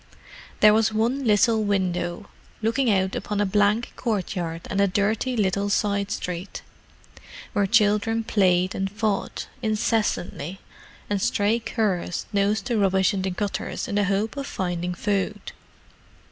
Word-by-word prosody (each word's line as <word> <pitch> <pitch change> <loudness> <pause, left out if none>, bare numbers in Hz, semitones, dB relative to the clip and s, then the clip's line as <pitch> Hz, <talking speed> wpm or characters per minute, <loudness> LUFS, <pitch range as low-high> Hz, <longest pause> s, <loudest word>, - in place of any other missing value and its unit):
There 210 0 +8
was 220 0 +3
one 235 +5 0
little 220 +1 +3
window, 185 -2 -1 0.4
looking 235 +3 +2
out 190 -2 +1
upon 210 -1 -3
a 205 - +3
blank 205 +3 +1
courtyard 180 -7 -2
and 195 - 0
a 200 - +4
dirty 215 +6 0
little 200 0 +1
side 200 0 0
street, 180 -3 -5 0.9
where 200 -1 +2
children 220 +1 +2
played 185 -4 +2
and 195 0 -2
fought 210 0 -2
incessantly, 210 -5 -1 0.5
and 205 -1 -1
stray 210 +5 +2
curs 200 -7 -1
nosed 200 0 +1
the 240 -3 0
rubbish 190 0 +3
in 195 - -1
the 190 - -1
gutters 200 +2 -3
in - - -4
the 205 0 +2
hope 200 +5 0
of 280 0 -4
finding 180 -1 -3
food. 205 +1 -2
205 Hz, 140 wpm, -24 LUFS, 190-220 Hz, 0.9 s, There